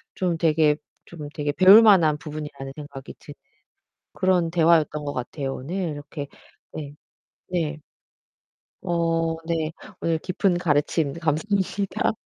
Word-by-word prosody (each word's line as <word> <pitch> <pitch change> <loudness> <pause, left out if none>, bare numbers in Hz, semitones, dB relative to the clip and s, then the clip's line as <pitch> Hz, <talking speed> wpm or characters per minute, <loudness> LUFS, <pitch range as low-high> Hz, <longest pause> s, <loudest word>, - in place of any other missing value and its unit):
좀 175 -3 -1
되게 155 -2 +3 0.3
좀 155 -4 -9
되게 145 -1 -2
배울만한 185 -3 +7
부분이라는 150 -3 -7
생각이 145 -3 -9
드는 145 - -12 0.8
그런 180 -3 +1
대화였던 160 -3 +2
거 145 - -3
같아요, 135 +2 -4
오늘. 140 +8 -6 0.2
이렇게 145 -1 -7 0.5
네. 145 -2 -7 0.6
네. 165 -4 -2 1.0
어 165 -1 0
네. 165 -2 -1 0.3
오늘 165 -1 +1
깊은 185 +1 0
가르침 150 -2 +1
감사합니다. 190 +5 -1
160 Hz, 250 characters per minute, -24 LUFS, 150-175 Hz, 1.0 s, 배울만한